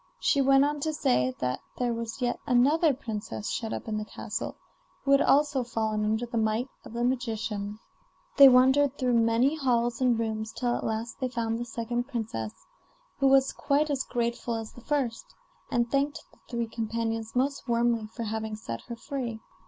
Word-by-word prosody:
She 280 - +3
went 270 +1 +5
on 295 0 -1
to 310 +2 -1
say 125 - +1
that 125 0 -1 0.2
there 245 -1 0
was 230 +2 -4
yet 245 0 0
another 290 +6 +4
princess 210 - -5
shut 225 -2 -3
up - - -5
in 215 -1 -1
the 210 - -4
castle, - - -5 0.5
who 275 - +1
had 275 - +6
also 290 -2 +3
fallen 220 -2 -1
under 220 +3 0
the 235 -1 -2
might 220 +3 0 0.2
of - - -11
the 235 0 -1
magician. 220 -4 -2 0.6
They 275 -2 +11
wandered 265 +2 +5
through 250 -2 +1
many 230 +4 +3
halls 240 -3 +1
and 245 -2 +3
rooms 220 -1 -2
till 245 -1 0
at - - -4
last 225 +1 -3
they 255 - -1
found 230 -2 -2
the 240 - -3
second 240 +1 -3
princess, 220 - -5 0.5
who 275 - +4
was 270 0 +4
quite 295 +2 +1
as 275 -2 0
grateful 235 -1 -2
as 225 -1 -5
the 245 - -14
first, 255 -5 -2 0.3
and 235 -1 0
thanked 280 +1 0
the - - -24
three 235 -2 -1
companions 225 0 -3
most 275 +2 0
warmly 235 -2 +1
for 230 +2 -6
having 220 0 -3
set 115 - -6
her 235 - -5
free. 235 -2 -4
235 Hz, 185 wpm, -28 LUFS, 225-265 Hz, 0.6 s, They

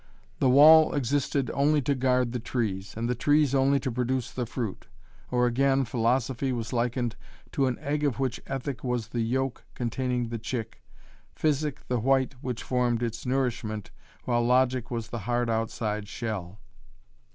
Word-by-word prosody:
The 130 - +3
wall 155 +4 +8
existed 140 0 0
only 150 +2 +3
to 140 - +1
guard 125 -2 +1
the 125 - -2
trees, 110 -5 -3
and 115 +1 -1
the 125 - +1
trees 145 +2 +2
only 140 +1 +3
to 130 - -2
produce 125 +1 -1
the 125 -2 -3
fruit. 115 -5 -5 0.4
Or 125 0 +2
again 135 +2 +2
philosophy 125 +2 0
was 120 0 -3
likened 120 0 0 0.4
to 135 -2 +1
an 125 - -1
egg 150 +1 -2
of 140 -5 +1
which 130 -3 -1
ethic 135 -1 -4
was 125 -3 -2
the 120 -1 -2
yolk 130 +3 -1
containing 125 0 -1
the 115 -1 -4
chick, 115 0 -5 0.5
physic 150 -2 -1
the 125 -1 0
white 135 +3 +2
which 125 -4 -4
formed 120 -2 0
its 115 +1 -4
nourishment 120 -5 -2 0.3
while 120 -1 +1
logic 125 0 +2
was 115 -2 -4
the 120 - -4
hard 120 +2 0
outside 110 -2 -2
shell. 105 -5 -5
125 Hz, 165 wpm, -27 LUFS, 115-135 Hz, 0.5 s, wall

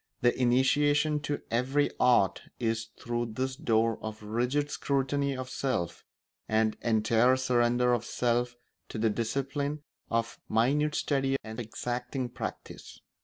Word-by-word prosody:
The 120 0 +3
initiation 145 +4 +3
to 145 0 -3
every 130 +5 +1
art 120 -6 +4 0.2
is 115 -1 -1
through 120 -1 -2
this 130 +3 -2
door 115 -2 +1
of 110 0 -6
rigid 125 +7 0
scrutiny 140 0 0
of 130 0 -4
self 130 -10 -2 0.5
and 110 0 +2
entire 115 +2 +3
surrender 125 -1 +2
of 120 - 0
self 120 0 0 0.3
to - - -6
the 110 0 +2
discipline 140 +6 -2 0.3
of 115 0 -1
minute 145 +7 +2
study 135 -2 +1
and 110 +1 -7
exacting 120 +2 -3
practice. 120 - -7
125 Hz, 125 wpm, -29 LUFS, 115-135 Hz, 0.5 s, art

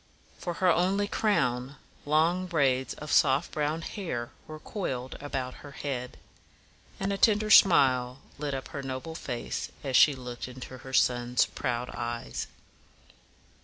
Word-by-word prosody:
For 175 -1 -4
her 185 0 +3
only 190 +4 +2
crown, 130 - 0 0.3
long 165 +5 +2
braids 135 -6 +1
of 150 0 -7
soft 140 +3 +3
brown 155 +2 -1
hair 145 - -4 0.2
were 155 0 -8
coiled 130 - -4
about 130 -3 -3
her 145 -1 -11
head; 125 -4 -4 0.8
and 195 +1 -1
a 195 - -3
tender 215 -1 +3
smile 130 -10 +6 0.2
lit 145 -2 -2
up 135 - -6
her 140 - -5
noble 135 +4 -5
face 125 -7 -4
as 135 -3 -2
she 145 +2 +7
looked 125 -2 -7
into 130 0 -9
her 130 0 -10
sons' 125 -1 +3
proud 125 0 -3
eyes. 120 0 -4
140 Hz, 140 wpm, -28 LUFS, 125-165 Hz, 0.8 s, she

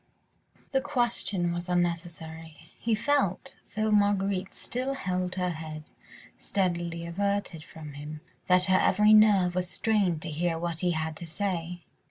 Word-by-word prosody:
The 270 -1 +2
question 240 -10 0
was 175 +1 -4
unnecessary. 165 -2 -3
He 230 -1 +1
felt, 240 -6 0 0.2
though 215 0 +1
Marguerite 200 -2 +2
still 260 +3 -3
held 185 -5 -2
her 180 -1 0
head 155 -2 -8 0.5
steadily 170 -3 -1
averted 195 -2 -2
from 155 -2 -10
him, 150 +2 -8 0.3
that 180 0 +5
her 185 0 +4
every 210 +1 +5
nerve 205 -4 +6
was 180 0 -1
strained 195 -9 +1
to 165 - -4
hear 165 +2 0
what 170 -1 -3
he 180 - +1
had 160 0 -2
to 170 - -8
say. 175 -1 -3
180 Hz, 145 wpm, -28 LUFS, 165-205 Hz, 0.5 s, nerve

